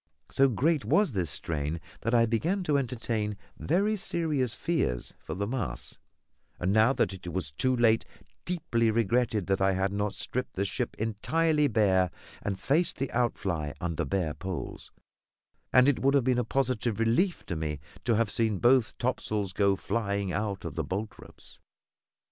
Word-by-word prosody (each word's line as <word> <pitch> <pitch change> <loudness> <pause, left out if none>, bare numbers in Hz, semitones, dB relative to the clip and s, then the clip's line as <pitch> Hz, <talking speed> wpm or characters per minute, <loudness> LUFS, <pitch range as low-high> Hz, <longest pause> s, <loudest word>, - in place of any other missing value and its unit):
So 135 0 +4
great 145 - +1
was 205 -6 +3
this 90 -5 -1
strain 75 +1 -2 0.2
that 115 +2 +1
I 115 -1 +5
began 165 - 0
to 150 -4 +1
entertain 115 -5 -1 0.2
very 200 +6 +1
serious 155 - -1
fears 100 - -1
for 80 - -6
the 100 +3 -1
masts; 100 - -4 0.6
and, 90 +2 +1
now 110 +4 +5
that 100 - +1
it 90 -2 -7
was 85 -4 -3
too 130 - +1
late, 115 -2 +4 0.4
deeply 155 -10 0
regretted 110 -1 +1
that 95 +1 0
I 95 0 +4
had 95 +1 0
not 105 0 -1
stripped 125 - -4
the 100 - 0
ship - - -3
entirely 150 +8 +1
bare 95 -6 +3 0.3
and 95 -1 -3
faced 145 - +1
the 135 -1 -2
outfly 95 -11 -1
under 85 -1 -2
bare 80 +1 -1
poles; 95 0 -6 0.8
and 130 +1 +6
it 145 - +3
would 135 +1 +3
have 140 - +4
been 125 0 +2
a - - +1
positive 120 -3 0
relief 120 - +1
to 90 - -3
me 75 -2 -3 0.2
to 120 -2 +2
have 110 -1 +1
seen 110 -2 +1
both 120 +1 +3
topsails 105 -6 -1
go 100 0 +3
flying 100 -4 -2
out 105 -2 -2
of - - -4
the 80 - -2
boltropes. 100 +8 -7
110 Hz, 165 wpm, -29 LUFS, 95-130 Hz, 0.8 s, and